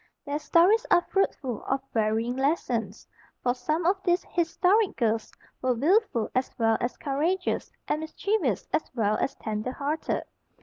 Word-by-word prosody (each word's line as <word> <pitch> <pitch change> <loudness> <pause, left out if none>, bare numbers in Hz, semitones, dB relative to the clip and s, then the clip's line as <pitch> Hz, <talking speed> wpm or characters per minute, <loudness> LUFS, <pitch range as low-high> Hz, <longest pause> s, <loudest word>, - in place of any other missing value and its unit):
Their 290 0 -2
stories 370 +9 +4
are 350 -1 +4
fruitful 270 - 0
of 270 - 0
varying 225 +2 +1
lessons, 245 - -1 0.4
for 245 - +2
some 310 +7 -2
of 380 +2 +2
these 355 -1 +1
historic 365 +5 +2
girls 225 -2 0 0.3
were 255 -1 +1
wilful 300 - +2
as 255 +1 0
well 225 -1 +3
as 240 - -2
courageous, 320 +7 -1 0.2
and 305 - 0
mischievous 315 - -1
as - - 0
well 215 -3 +2
as - - -1
tender 215 +3 -3
hearted. 290 +4 -2
280 Hz, 145 wpm, -27 LUFS, 235-350 Hz, 0.4 s, stories